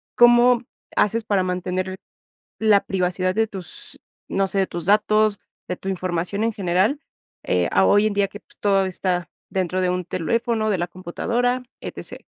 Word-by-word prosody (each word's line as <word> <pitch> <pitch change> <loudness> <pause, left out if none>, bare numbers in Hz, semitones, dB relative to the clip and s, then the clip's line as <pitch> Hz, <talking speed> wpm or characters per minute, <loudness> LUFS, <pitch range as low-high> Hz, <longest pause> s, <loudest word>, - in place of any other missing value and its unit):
¿cómo 240 0 +6 0.3
haces 225 +2 +2
para 200 -3 +1
mantener 185 +1 -2 0.6
la 215 -2 +4
privacidad 185 0 0
de 225 - +3
tus, 190 -4 -8 0.3
no 195 0 +1
sé, 195 +1 -1
de 190 - +2
tus 170 -2 -6
datos, 215 +1 +3 0.3
de 180 - -2
tu 190 - -6
información 185 +2 -1
en 230 - 0
general, 195 - +1 0.4
eh, - - +1
a - - +5
hoy 205 +1 +5
en 215 - -2
día 200 -1 +1
que, 205 - -10
pues, - - -25
todo 195 -2 +3
está 180 -2 -2 0.2
dentro 185 -1 -1
de 180 - +1
un 180 0 -1
teléfono, 220 +6 0
de 200 - +1
la 175 0 -1
computadora, 235 +8 -1 0.2
etc? - - -7
195 Hz, 170 wpm, -22 LUFS, 180-215 Hz, 0.6 s, cómo